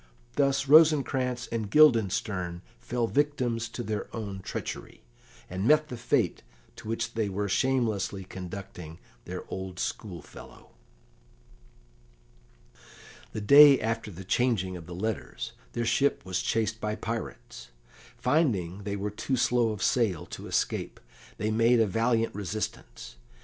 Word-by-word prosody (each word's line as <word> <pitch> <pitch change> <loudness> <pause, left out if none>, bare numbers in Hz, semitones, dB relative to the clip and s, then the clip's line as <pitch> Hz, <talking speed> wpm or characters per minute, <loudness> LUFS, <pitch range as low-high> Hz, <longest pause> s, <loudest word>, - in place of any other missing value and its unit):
Thus 140 -1 +2
Rosencrantz 135 -5 +4
and 110 -3 -2
Guildenstern 100 - +3 0.2
fell 120 -1 -1
victims 125 -4 0
to 120 - -5
their 110 -2 -3
own 100 -4 -5
treachery, 95 - -6 0.4
and 95 +4 -2
met 155 +1 +4
the 125 - -5
fate 115 - 0 0.4
to - - -10
which 115 +1 -2
they 110 -3 -1
were 100 +1 -2
shamelessly 110 -4 0
conducting 90 -3 -8 0.3
their - - -6
old 95 -1 -6
schoolfellow. 90 -1 -7 2.6
The 110 - -4
day 140 +5 +8
after 115 -1 -2
the 95 0 -10
changing 95 -4 +1
of 85 -2 -9
the 90 - -7
letters 110 +4 -4 0.2
their 120 - -1
ship 140 +5 +1
was 95 -1 -1
chased 110 0 -1
by 105 0 -1
pirates. 115 0 -6 0.5
Finding 105 - +1
they 100 -1 -2
were 100 +1 -3
too 130 +5 -2
slow 120 -1 +2
of 105 -4 -4
sail 110 -10 +1
to - - -8
escape, - - -1 0.4
they 110 +1 -1
made 115 +2 +4
a 110 - +5
valiant 115 +3 +1
resistance. 100 - -5
110 Hz, 130 wpm, -28 LUFS, 95-125 Hz, 2.6 s, day